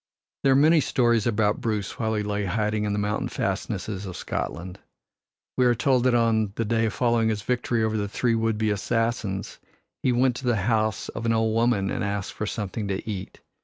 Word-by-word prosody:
There 135 - +5
are - - +4
many 155 +3 +5
stories 120 -5 +2
about 105 -2 +1
Bruce 105 -5 -2
while 110 -1 0
he 105 - 0
lay 105 0 -2
hiding 105 +2 0
in 105 - -1
the - - -1
mountain 105 +1 -1
fastnesses 100 -2 -3
of 90 - -6
Scotland. 90 +4 -4 0.8
We 125 - +4
are 120 - +3
told 125 +3 +2
that 125 -1 +4
on 110 -3 +2
the 115 - -1
day 115 +1 +1
following 115 -1 +1
his 105 -2 -2
victory 120 -1 0
over 110 0 0
the 100 -1 -2
three 120 +3 +1
would 115 -1 +1
be 110 0 +1
assassins 110 -1 -2 0.4
he 130 - +2
went 125 0 +2
to 130 - -7
the 120 -2 +3
house 110 -1 0
of 115 - -4
an 115 - +3
old 110 -1 +1
woman 115 -4 +2
and - - -2
asked 100 -1 -3
for 105 - -4
something 105 0 -3
to 100 +2 -3
eat. 95 -3 -6
110 Hz, 205 wpm, -25 LUFS, 105-120 Hz, 0.8 s, There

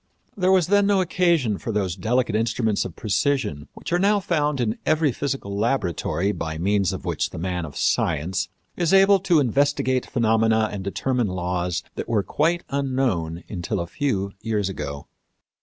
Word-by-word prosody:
There 185 -1 +2
was 185 -3 +4
then 205 +2 +3
no 200 -1 +3
occasion 170 - +1
for 115 - -4
those 95 -4 -1
delicate 115 +3 0
instruments 110 -1 0
of 90 - -7
precision 100 - -1
which - - -6
are 175 - +3
now 205 +2 +3
found 150 -6 0
in 115 -2 -1
every 155 -2 +2
physical 125 -7 -3
laboratory 100 - 0
by 80 -5 -4
means 100 +2 +1
of - - -6
which - - -1
the - - -9
man 90 0 -2
of 75 - -9
science 85 +3 0 0.3
is 175 +1 +2
able 195 +1 +6
to 180 -4 +3
investigate 135 0 +1
phenomena 110 -1 +2
and 100 -2 -5
determine 120 +4 -1
laws 90 -1 -2
that - - -6
were 110 -4 +2
quite 165 - 0
unknown 130 - -1
until 90 -4 -3
a 85 - -2
few 100 - -2
years 105 -3 -1
ago. 70 -6 -5
110 Hz, 170 wpm, -23 LUFS, 95-145 Hz, 0.3 s, able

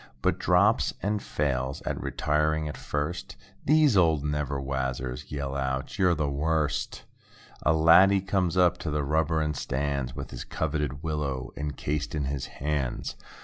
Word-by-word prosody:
But - - +2
drops 100 +5 +3
it - - -8
and 105 +1 0
fails 70 -2 -2
at - - -3
retiring 75 0 0
at 75 - -5
first. 75 +4 -4 0.3
These 150 -4 +5
old 80 -6 +4
"never 75 -1 -1
wazzers" 65 -2 -3
yell 70 -1 -3
out—"You're 70 +7 0
the 75 -2 0
worst." 75 +1 -1 0.6
A - - +3
laddie 95 +5 +6
comes 95 -2 0
up 90 -1 +4
to 80 - -3
the 75 0 0
rubber 80 +2 +1
and 75 -1 -1
stands 70 -2 -2
With - - -6
his - - -6
coveted 75 -2 -2
willow 75 -5 -2
encased 75 +1 -3
in 75 - -1
his 70 -1 -3
hands. 70 -3 -3
75 Hz, 150 wpm, -27 LUFS, 70-80 Hz, 0.6 s, laddie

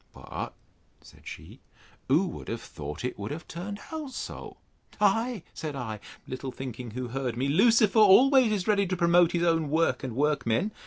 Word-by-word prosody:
But, - - -7 0.5
said - - -17
she, - - -10 0.5
who 155 +9 +3
would 180 - -7
have 115 - -3
thought 75 +3 -7
it 125 - -4
would 100 +1 -4
have 160 +3 -7
turned 200 +5 -6
out 310 -3 -5
so? - - -7 0.4
Ay, 220 0 +1
said 155 -3 -5
I, 110 -5 -5 0.3
little 130 +1 -5
thinking 125 -2 -7
who 125 +2 -5
heard 125 -2 -3
me, 130 +2 0
Lucifer 220 +7 +4
always 250 +4 +6
is 200 -2 -1
ready 200 -2 +3
to 185 0 -2
promote 170 0 +4
his 175 -1 +1
own 165 -3 +2
work 160 0 +1
and 125 -4 -4
workmen. 145 - +1
165 Hz, 175 wpm, -27 LUFS, 130-205 Hz, 0.5 s, always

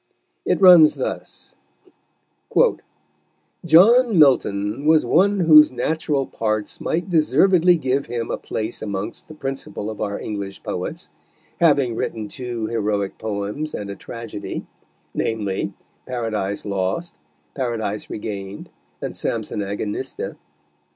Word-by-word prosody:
It - - +2
runs 180 -5 +8
thus: - - -6 2.1
"John 220 +7 +6
Milton 125 -3 +3
was 160 -1 +5
one 195 +3 +3
whose 155 -2 +8
natural 140 +2 -1
parts 110 -3 -2
might 170 +2 -1
deservedly 175 +2 +4
give 135 -2 -1
him 115 -1 -3
a - - -1
place 110 +2 -4
amongst 105 +1 -5
the 155 - -11
principal 135 -7 -5
of 110 - -8
our 100 -1 -2
English 100 -2 -6
Poets, - - -5 0.5
having 145 -7 +3
written 110 -1 -3
two 120 -2 -4
Heroick 105 -3 -2
Poems 105 +8 -4
and 100 -1 -5
a - - -6
Tragedy, 115 -3 -7 0.5
namely 105 -4 -2 0.4
Paradice 110 -5 -3
Lost, 100 - -2 0.4
Paradice 110 -5 -3
Regain'd, 100 -2 -6 0.3
and - - -4
Sampson - - -3
Agonista. 100 +1 -4
115 Hz, 110 wpm, -21 LUFS, 105-155 Hz, 2.1 s, runs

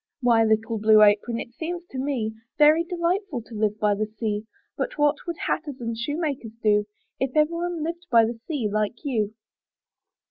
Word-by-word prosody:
"Why, 235 -3 +4
little 220 +1 +1
Blue 215 0 +6
Apron, 210 +3 +3
it 235 - -7
seems 345 +5 -5
to 260 - -5
me 255 -6 -1 0.2
Very 305 +2 +6
delightful 345 - -1
to 225 - -14
live 210 -1 0
by 210 -1 +3
the 215 +1 -1
sea; 215 0 -3 0.3
But - - -3
what 295 0 +3
would 340 -1 -3
hatters 290 -5 -2
and 230 -1 -3
shoemakers 280 -2 -3
do 210 -1 +3 0.3
If 265 +1 -2
every 305 +2 +4
one 340 -1 -2
lived 340 +2 -5
by 230 -2 +6
the 230 +1 -4
sea 285 -9 -1
like 215 +6 -2
you?" 220 -6 -1
240 Hz, 180 wpm, -25 LUFS, 215-310 Hz, 0.3 s, Blue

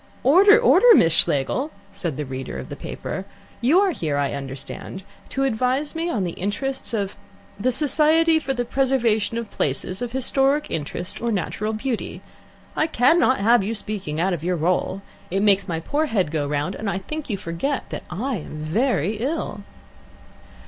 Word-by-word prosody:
"Order, 390 - +7
order, - - +5
Miss 165 - +5
Schlegel!" 155 - +2 0.2
said 165 -7 -4
the 150 - -3
reader 130 0 -6
of - - -7
the - - -6
paper. 190 - -6 0.4
"You 285 +10 +4
are 400 -2 +2
here, 155 - -2
I 140 -1 0
understand, 135 +7 -7 0.3
to 270 - -1
advise 260 +3 0
me 330 +1 -2
in 215 - -1
the 175 - -2
interests 255 +11 -3
of 200 -2 -2 0.4
the 255 +5 +1
Society 315 +4 +4
for 275 -3 -3
the 245 -2 -1
Preservation 235 -4 +1
of 230 -2 -5
Places 165 - -2
of 245 -1 -3
Historic 270 +3 +1
Interest 165 +3 -3
or 235 0 0
Natural 210 +2 -2
Beauty. 235 +1 -4 0.5
I 310 - +2
cannot 265 0 +3
have 230 +1 +4
you 220 +4 -2
speaking 195 -8 -2
out 185 +2 +1
of 165 -3 -4
your 180 +1 0
role. 180 +3 -1 0.3
It 195 +3 0
makes 200 -2 +3
my 165 -2 -2
poor 295 - -1
head 190 - 0
go 150 -3 -1
round, 150 +5 -1
and 215 0 -4
I 195 - -1
think 305 +10 -6
you 205 - -1
forget 185 +12 -3
that - - -4
I 235 +7 -2
am 155 -2 -8
very 200 - 0
ill." 250 -4 -3
215 Hz, 175 wpm, -23 LUFS, 175-270 Hz, 0.5 s, Order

